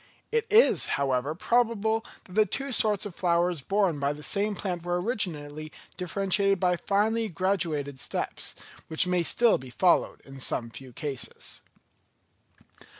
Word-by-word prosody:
It 460 0 0
is, 445 +3 +5
however, 140 +1 0
probable 225 +2 +1 0.2
that 180 - -15
the 215 +1 +3
two 275 0 -3
sorts 215 -4 +3
of 205 - -6
flowers 175 -2 +1
borne 195 -1 +1
by 140 +1 0
the 150 0 -11
same 205 +8 0
plant 180 -3 -3
were 175 +1 -1
originally 155 -8 -2 0.2
differentiated 195 +1 +1
by 180 0 +2
finely 215 +4 0
graduated 165 -7 -1
steps, - - -3 0.3
which 160 +2 +1
may 180 -1 +1
still 230 +6 +3
be 130 0 -10
followed 175 +8 +2
in 135 -1 -12
some 120 -2 -1
few 130 +1 -10
cases. 135 +1 -5
180 Hz, 145 wpm, -27 LUFS, 150-210 Hz, 0.3 s, is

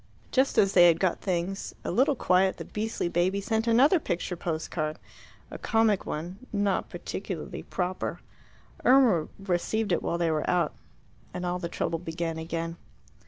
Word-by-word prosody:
Just 265 +1 +2
as 195 -1 +4
they 175 -1 +8
had 165 -1 +4
got 185 -3 0
things 185 +1 -2
a - - -2
little 275 +3 +3
quiet 185 -3 +2
the - - -7
beastly 215 -3 -2
baby 180 +3 +1
sent 220 +3 -1
another 270 +10 +5
picture 180 - -2
post 165 -2 -3
card 155 -1 -2 0.5
a - - -7
comic 225 -3 +2
one, 175 +5 -5
not 205 -3 0
particularly - - -5
proper. 185 0 -3 0.6
Irma 245 - +5
received 195 +3 -1
it 170 - +2
while 170 - -1
they 170 -1 +1
were 155 -1 -1
out, 175 -3 +1 0.6
and 180 - -3
all 180 0 -1
the 170 -2 -4
trouble 165 - -2
began 165 -1 -3
again. 165 +1 -4
180 Hz, 165 wpm, -28 LUFS, 170-210 Hz, 0.6 s, they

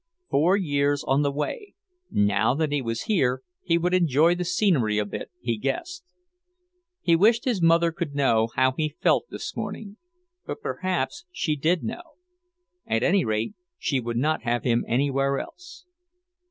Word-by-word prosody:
Four 170 +8 +4
years 145 -5 0
on 135 +2 +2
the 145 - +2
way; 405 - -4 0.3
now 105 +4 +2
that 155 0 0
he 145 -1 0
was 115 -2 -3
here, 130 - +1 0.2
he 170 -1 +1
would 175 +2 0
enjoy 165 -2 +4
the 180 0 -2
scenery 170 - +1
a 105 - +1
bit, 100 - -6
he 115 -2 -2
guessed. 345 - -3 1.0
He 170 - +3
wished 225 +7 +3
his 235 -8 0
mother 165 0 +4
could 165 -3 -5
know 115 -5 +2
how 130 0 +3
he 155 +2 -3
felt - - +3
this - - -6
morning. 210 -1 -6 0.5
But - - -6
perhaps 185 - -3
she 165 - -1
did 160 +5 +1
know. - - -4 0.9
At 115 +1 0
any 185 +3 +3
rate, 110 - -1 0.2
she 135 - 0
would 120 -1 -3
not 155 +5 +1
have 120 +1 -1
him 120 -2 +2
anywhere 135 +2 +1
else. 180 - -9
150 Hz, 165 wpm, -25 LUFS, 125-180 Hz, 1.0 s, Four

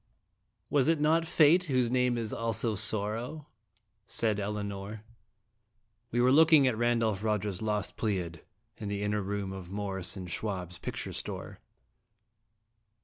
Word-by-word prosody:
ACT - - -45
I. - - -41 0.5
" - - -48
'Was 140 -3 +3
it 165 -1 +3
not 160 +2 +3
Fate, 165 +3 +5
whose 130 -6 +1
name 125 -1 +2
is 115 -2 -3
also 115 0 -1
Sor 105 0 +1
row?' 125 +7 -6 0.3
" - - -41 0.3
said 110 -3 0
Elinor. 100 0 -4 1.1
We 120 - -1
were 125 +1 +5
looking 155 0 +7
at 130 -3 +2
Randolph 115 -3 +1
Rogers's 105 -3 -1
"Lost 105 -1 -2
Pleiad, 90 -6 -2 0.2
" - - -45
in 105 - -5
the 100 0 -2
inner 105 0 0
room 100 0 -3
of 95 -2 -8
Morris 95 -2 -3
& - - -9
Schwab's 90 -2 -4
picture - - -5
store. - - -6
110 Hz, 160 wpm, -30 LUFS, 100-125 Hz, 1.1 s, looking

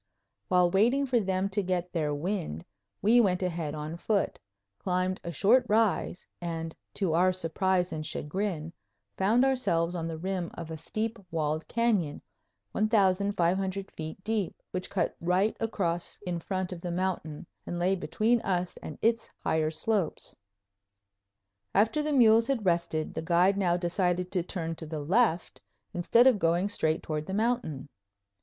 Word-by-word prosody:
While 180 -1 +4
waiting 240 +9 +3
for 250 -3 +2
them 190 -1 0
to 200 +1 0
get 180 -1 -2
their 155 -4 0
wind 155 - -3 0.4
we 235 +4 +6
went 185 -4 +1
ahead 165 -4 -2
on 155 +2 -5
foot, 200 +3 0 0.4
climbed 185 0 -1
a 170 - -4
short 225 - +4
rise, 215 -4 +1 0.2
and 165 -1 -4 0.2
to 185 -6 0
our 180 +3 +4
surprise 185 +1 0
and 155 - -3
chagrin 165 +1 -3 0.4
found 225 +7 +3
ourselves 175 -11 +1
on 165 -2 -3
the 165 -1 -4
rim 185 0 -3
of 165 -1 -7
a - - -3
steep 215 +8 -3
walled 155 -1 -1
canyon, 220 -10 +1 0.5
1500 195 - +1
feet 160 +4 -7
deep, 215 -5 -2
which 185 0 -4
cut 195 - -1
right 180 +5 +2
across 175 -6 -1
in 175 -2 -2
front 185 +1 -3
of 170 - -9
the 175 - -4
mountain 170 -4 -2 0.2
and 175 - -3
lay 180 +2 +2
between 220 +5 +1
us 180 -2 -1
and 150 - -8
its 230 +1 +2
higher 155 -1 +1
slopes. 170 +3 -1 1.4
After 220 +9 +3
the 300 0 -1
mules 230 -4 +5
had 260 -7 -1
rested, 170 -3 0
the - - -3
guide 175 +4 +3
now 180 -3 +2
decided 180 0 0
to 185 - +1
turn 165 -2 -3
to 160 - -6
the 155 0 -4
left 180 +2 +1 0.3
instead 230 +8 +4
of 255 -6 +5
going 170 +4 +2
straight 160 -5 0
toward 155 -1 -3
the 190 - -3
mountain. 215 - -1
180 Hz, 155 wpm, -29 LUFS, 165-205 Hz, 1.4 s, we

